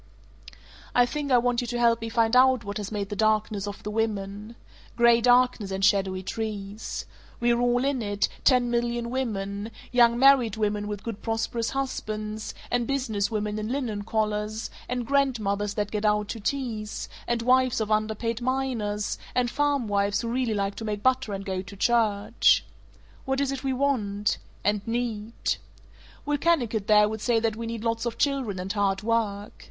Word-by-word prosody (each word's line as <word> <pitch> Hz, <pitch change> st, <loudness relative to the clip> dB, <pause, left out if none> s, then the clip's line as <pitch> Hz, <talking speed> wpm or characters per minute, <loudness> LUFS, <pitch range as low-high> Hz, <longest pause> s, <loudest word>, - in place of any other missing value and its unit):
"I 245 Hz, -, +6 dB
think 285 Hz, +2 st, -3 dB
I 250 Hz, -, +7 dB
want 245 Hz, 0 st, +1 dB
you 245 Hz, -, -4 dB
to 240 Hz, +1 st, -2 dB
help 235 Hz, -1 st, +3 dB
me 225 Hz, -, -3 dB
find 230 Hz, 0 st, +2 dB
out 255 Hz, -1 st, +5 dB
what 200 Hz, 0 st, -5 dB
has 205 Hz, -1 st, -5 dB
made 200 Hz, -2 st, -3 dB
the 205 Hz, -, -4 dB
darkness 215 Hz, -1 st, +1 dB
of 205 Hz, -, -7 dB
the 210 Hz, -, -4 dB
women. 210 Hz, 0 st, -3 dB, 0.4 s
Gray 235 Hz, 0 st, +5 dB
darkness 245 Hz, -4 st, +3 dB
and 190 Hz, 0 st, 0 dB
shadowy 190 Hz, -2 st, +2 dB
trees. 210 Hz, 0 st, -4 dB, 0.3 s
We're 235 Hz, 0 st, +2 dB
all 245 Hz, +1 st, +2 dB
in 275 Hz, -3 st, 0 dB
it, 205 Hz, -1 st, 0 dB, 0.2 s
ten 250 Hz, -2 st, +4 dB
million 235 Hz, 0 st, -1 dB
women, 205 Hz, -5 st, -3 dB, 0.2 s
young 235 Hz, -1 st, +5 dB
married 255 Hz, -5 st, +5 dB
women 210 Hz, -1 st, -1 dB
with 205 Hz, -1 st, -5 dB
good 230 Hz, -3 st, -5 dB
prosperous 225 Hz, 0 st, -1 dB
husbands, 215 Hz, -5 st, -4 dB, 0.2 s
and 245 Hz, -1 st, +1 dB
business 230 Hz, -7 st, 0 dB
women 210 Hz, -1 st, -2 dB
in 215 Hz, -, -3 dB
linen 240 Hz, -5 st, -2 dB
collars, 215 Hz, 0 st, -2 dB, 0.2 s
and 250 Hz, -1 st, -2 dB
grandmothers 215 Hz, -7 st, 0 dB
that 205 Hz, -1 st, -2 dB
gad 210 Hz, -1 st, -2 dB
out 210 Hz, -1 st, +2 dB
to 230 Hz, -, -4 dB
teas, 220 Hz, -3 st, -3 dB, 0.2 s
and 235 Hz, -1 st, 0 dB
wives 255 Hz, 0 st, +3 dB
of 220 Hz, -1 st, -2 dB
under 215 Hz, 0 st, +1 dB
paid 230 Hz, +2 st, -3 dB
miners, 240 Hz, -5 st, -1 dB, 0.2 s
and 245 Hz, -1 st, +1 dB
farmwives 215 Hz, -9 st, +1 dB
who 230 Hz, -, -2 dB
really 240 Hz, -2 st, 0 dB
like 200 Hz, 0 st, -1 dB
to -, -, -5 dB
make 210 Hz, -2 st, -3 dB
butter 260 Hz, -3 st, +2 dB
and 195 Hz, 0 st, -4 dB
go 190 Hz, -1 st, -2 dB
to 200 Hz, +1 st, -11 dB
church. 210 Hz, -1 st, +3 dB, 0.6 s
What 265 Hz, 0 st, 0 dB
is 280 Hz, -1 st, +1 dB
it 275 Hz, -1 st, -5 dB
we 270 Hz, -, 0 dB
want 225 Hz, -7 st, 0 dB, 0.2 s
and 205 Hz, 0 st, +1 dB
need? 230 Hz, -2 st, -2 dB, 0.7 s
Will 290 Hz, 0 st, 0 dB
Kennicott 240 Hz, -11 st, +1 dB
there 210 Hz, -1 st, +6 dB
would 220 Hz, 0 st, -5 dB
say 235 Hz, -1 st, +2 dB
that 225 Hz, -1 st, 0 dB
we 230 Hz, +1 st, -5 dB
need 230 Hz, -1 st, -5 dB
lots 230 Hz, 0 st, -1 dB
of 235 Hz, -, -4 dB
children 265 Hz, -9 st, 0 dB
and 190 Hz, +2 st, -3 dB
hard 200 Hz, -1 st, 0 dB
work. 215 Hz, -3 st, -1 dB
225 Hz, 180 wpm, -26 LUFS, 210-245 Hz, 0.7 s, I